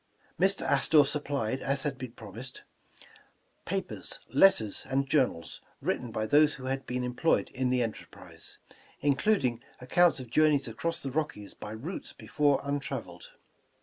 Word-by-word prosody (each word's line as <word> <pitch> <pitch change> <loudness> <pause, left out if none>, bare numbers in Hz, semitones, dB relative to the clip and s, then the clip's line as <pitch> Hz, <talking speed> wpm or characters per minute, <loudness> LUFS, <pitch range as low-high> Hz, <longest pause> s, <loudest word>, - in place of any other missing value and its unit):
Mr. 195 +2 +2
Astor 145 +1 +4
sup 150 +1 -2
plied, 130 -3 -1
as 135 0 -1
he 150 - +2
had 130 -3 -8
promised, 115 +4 -9 1.0
papers, - - -3
letters 110 - +4
and 135 +1 +1
jour 135 -2 +4
nals, 85 - -8 0.2
written 120 -2 -2
by 110 0 -2
those 150 +5 +4
who 130 - -9
had 135 +1 -3
been 125 0 -2
employed 125 +6 +1
in 130 -1 -1
the 125 -1 +2
enterprise, 115 -2 -9 0.4
including 135 - +2 0.2
accounts 170 +6 +3
of 125 -3 -9
journeys 150 -1 +3
across 165 +9 -3
the 135 - -3
Rockies 140 -9 -3
by - - -9
routes 120 - -6
before 145 -2 +1
untraveled. 140 0 -5
135 Hz, 150 wpm, -29 LUFS, 125-150 Hz, 1.0 s, Astor